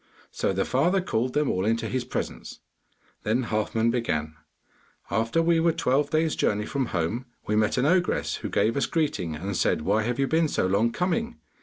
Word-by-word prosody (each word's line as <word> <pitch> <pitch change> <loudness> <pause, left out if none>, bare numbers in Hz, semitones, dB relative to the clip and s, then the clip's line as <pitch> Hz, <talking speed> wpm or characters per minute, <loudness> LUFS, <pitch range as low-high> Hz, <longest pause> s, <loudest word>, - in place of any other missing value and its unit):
So - - -1
the 95 0 0
father 170 +9 +2
called 125 -8 -1
them 150 -1 +2
all 95 - -1
into 115 +2 0
his 130 0 -2
presence. - - -5 0.6
Then 115 +5 0
Halfman 110 +1 0
began: 80 -11 -1 0.8
'After 115 - +1
we 165 0 +3
were 165 +1 +3
twelve 145 -1 +1
days' 160 0 +1
journey 105 0 0
from 135 0 -2
home, 105 +9 -2 0.2
we 105 - 0
met 110 +2 +2
an 125 - +2
ogress, 180 +3 +1
who - - -5
gave 110 +3 +1
us 140 - +1
greeting 115 - -1
and 95 +5 -4
said, 75 - +1
"Why 110 - +2
have 120 +3 -2
you 135 - +2
been 160 +3 +2
so 145 - 0
long 100 +5 +2
coming? 225 - -1
120 Hz, 190 wpm, -26 LUFS, 105-155 Hz, 0.8 s, we